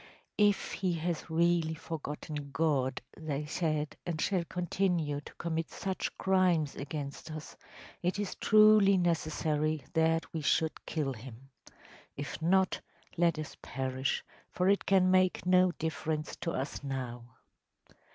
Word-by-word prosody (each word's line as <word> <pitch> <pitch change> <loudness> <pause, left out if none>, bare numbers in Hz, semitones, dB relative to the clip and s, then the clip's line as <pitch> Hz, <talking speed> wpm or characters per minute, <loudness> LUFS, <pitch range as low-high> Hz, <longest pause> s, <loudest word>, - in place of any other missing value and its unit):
“If 205 -1 +3
he 185 -2 -1
has 170 0 -3
really 165 0 +2
forgotten 150 -2 -6
God,‚ÄĚ 140 0 -1
they 150 0 -1
said, 155 -1 -1
“and 170 -3 -3
shall 185 +1 +1
continue 175 -4 0
to - - -12
commit 165 -1 -2
such 190 -1 -3
crimes 180 -6 +2
against 140 +1 -6
us, 155 -1 -7 0.5
it 180 +2 0
is 205 -2 -2
truly 215 -2 +6
necessary 155 -3 0
that 165 0 +1
we 160 - -2
should 160 +2 0
kill 145 -4 -1
him. 125 +3 -11 0.7
If 145 +3 -5
not, 190 +3 +2 0.3
let 170 -1 +3
us 155 -1 -6
perish, 130 0 -2 0.3
for 180 - 0
it 200 +1 +3
can 185 -1 +5
make 185 -1 +3
no 180 0 +5
difference 155 -1 -3
to 165 - -2
us 135 -1 -3
now. 125 -3 -5
160 Hz, 130 wpm, -31 LUFS, 145-180 Hz, 0.7 s, truly